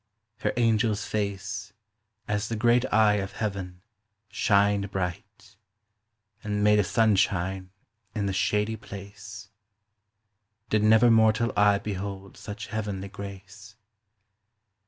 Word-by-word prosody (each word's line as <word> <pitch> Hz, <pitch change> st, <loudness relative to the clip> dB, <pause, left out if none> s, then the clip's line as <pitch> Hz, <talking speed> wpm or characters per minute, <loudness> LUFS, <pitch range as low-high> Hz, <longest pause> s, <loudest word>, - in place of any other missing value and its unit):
Her -, -, 0 dB
angels 110 Hz, -2 st, +2 dB
face, 100 Hz, 0 st, -4 dB, 0.5 s
As 105 Hz, +1 st, -1 dB
the 115 Hz, -, -2 dB
great 120 Hz, +3 st, +2 dB
eye 105 Hz, -2 st, +4 dB
of 95 Hz, -1 st, -4 dB
heaven, 95 Hz, -4 st, -4 dB, 0.5 s
shyned 100 Hz, -1 st, +2 dB
bright, 95 Hz, +2 st, -5 dB, 0.9 s
And 105 Hz, -1 st, -1 dB
made 105 Hz, 0 st, +5 dB
a -, -, +4 dB
sunshine 95 Hz, -3 st, +1 dB, 0.5 s
in 105 Hz, -2 st, -1 dB
the 100 Hz, -, -1 dB
shady 105 Hz, +3 st, 0 dB
place; 100 Hz, 0 st, -10 dB, 1.2 s
Did 110 Hz, -, +3 dB
never 110 Hz, +2 st, +5 dB
mortall 110 Hz, +1 st, +3 dB
eye 105 Hz, 0 st, +4 dB
behold 100 Hz, -1 st, -6 dB
such 105 Hz, +1 st, -7 dB
heavenly 100 Hz, -3 st, -3 dB
grace. 100 Hz, +1 st, -10 dB
105 Hz, 110 wpm, -27 LUFS, 100-110 Hz, 1.2 s, made